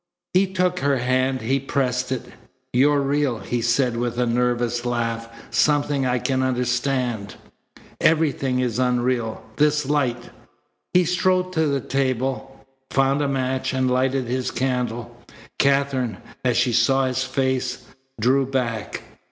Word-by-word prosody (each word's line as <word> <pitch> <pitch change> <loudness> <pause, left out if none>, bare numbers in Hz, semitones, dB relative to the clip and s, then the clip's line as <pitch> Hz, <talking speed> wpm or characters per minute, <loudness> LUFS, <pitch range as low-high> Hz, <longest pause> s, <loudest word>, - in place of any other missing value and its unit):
He 190 +2 +4
took 180 -1 0
her 140 -2 +2
hand. 130 +1 +1
He 130 +5 +1
pressed 130 -2 -1
it. 130 - -2 0.5
"You're 140 +3 +4
real!" 140 -3 0
he 110 +4 -3
said 120 +1 +1
with 120 0 -2
a 125 - +2
nervous 120 0 0
laugh. 115 -1 -2 0.2
"Something 145 -2 +2
I 125 0 +1
can 130 +1 0
understand. 125 -3 -1 0.6
Everything 140 -5 +2
is 125 -1 -1
unreal. 125 -2 0
This 150 0 +3
light 130 -4 -1 0.3
" - - -49
He 180 -1 +5
strode 185 +1 +1
to 160 -2 +2
the 140 -2 0
table, 135 +1 -2 0.2
found 135 +1 +2
a 145 - +1
match, 130 -1 -1
and 130 -1 +1
lighted 130 +1 +1
his 125 +1 -2
candle. 120 -2 -2 0.4
Katherine, 135 -5 +1 0.3
as 125 -2 +2
she 125 - +2
saw 135 +3 +3
his 130 0 0
face, 130 -1 -1 0.3
drew 130 +4 +3
back. 120 -5 -2
130 Hz, 140 wpm, -23 LUFS, 120-140 Hz, 0.6 s, He